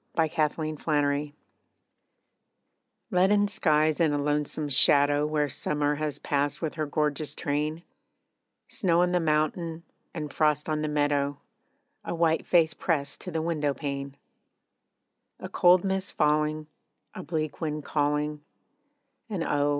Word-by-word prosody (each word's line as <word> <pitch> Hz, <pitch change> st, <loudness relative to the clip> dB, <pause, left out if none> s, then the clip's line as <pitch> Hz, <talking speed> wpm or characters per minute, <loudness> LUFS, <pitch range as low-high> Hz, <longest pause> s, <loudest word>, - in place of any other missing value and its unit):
AN 160 Hz, -1 st, +3 dB
AUTUMN 155 Hz, 0 st, -1 dB, 0.3 s
DAY 145 Hz, +1 st, -3 dB, 1.8 s
Leaden 205 Hz, +2 st, +3 dB
skies 155 Hz, -6 st, +2 dB
and 155 Hz, -3 st, +3 dB
a -, -, +1 dB
lonesome 150 Hz, +1 st, -1 dB
shadow 145 Hz, +1 st, +4 dB
Where 150 Hz, -1 st, 0 dB
summer 145 Hz, +2 st, -1 dB
has 150 Hz, 0 st, -2 dB
passed 145 Hz, 0 st, -1 dB
with 160 Hz, -3 st, -3 dB
her 155 Hz, -1 st, -3 dB
gorgeous 150 Hz, 0 st, -1 dB
train; 150 Hz, +3 st, -2 dB, 0.8 s
Snow 175 Hz, -3 st, +1 dB
on 180 Hz, -, +1 dB
the 180 Hz, -, +2 dB
mountain, 160 Hz, +1 st, -1 dB, 0.3 s
and 150 Hz, -3 st, -6 dB
frost 150 Hz, -1 st, +1 dB
on 155 Hz, -1 st, -1 dB
the 155 Hz, -, -1 dB
meadow 145 Hz, -1 st, 0 dB, 0.6 s
A -, -, -4 dB
white 165 Hz, -1 st, +1 dB
face 165 Hz, -3 st, +4 dB
pressed 145 Hz, -5 st, -2 dB
to -, -, -6 dB
the 160 Hz, -2 st, -2 dB
window 150 Hz, -4 st, -1 dB
pane; 140 Hz, -1 st, -5 dB, 1.2 s
A -, -, -6 dB
cold 180 Hz, 0 st, +4 dB
mist 190 Hz, -1 st, -2 dB
falling, 150 Hz, +1 st, +1 dB, 0.5 s
a -, -, -7 dB
bleak 155 Hz, -1 st, -4 dB
wind 150 Hz, -2 st, -3 dB
calling, 150 Hz, 0 st, -1 dB, 0.9 s
And 190 Hz, -6 st, -2 dB
oh! 145 Hz, -1 st, +1 dB
150 Hz, 135 wpm, -27 LUFS, 145-165 Hz, 1.8 s, shadow